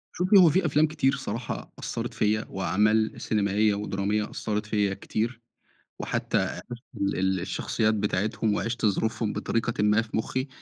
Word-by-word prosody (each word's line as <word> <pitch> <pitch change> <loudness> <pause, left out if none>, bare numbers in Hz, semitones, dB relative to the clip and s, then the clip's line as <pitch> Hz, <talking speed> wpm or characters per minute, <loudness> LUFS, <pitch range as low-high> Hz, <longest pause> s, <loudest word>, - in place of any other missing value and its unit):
شوفي، 185 +3 +4
هو 180 -4 +8
في 175 +3 +2
أفلام 150 +1 +3
كتير 140 -3 +1
صراحة 120 -3 -5
أثّرت - - -4
فيّا، 110 +1 +1
وأعمال 105 +3 +1
سينمائية، 105 0 +2
ودرامية 105 +1 -1
أثّرت 105 -1 -3
فيّا 105 -2 +1
كتير. 115 +4 -3 0.6
وحتى - - -1
عرفت - - -1 0.5
ال 95 -1 +1
الشخصيات 110 +5 0
بتاعتهم، 105 +1 0
وعِشت 115 +1 -2
ظروفهم 110 +1 0
بطريقةً 115 -2 -1
ما 105 +1 +4
في 110 -1 -4
مُخّي. 130 +4 -2
110 Hz, 140 wpm, -26 LUFS, 105-120 Hz, 0.6 s, هو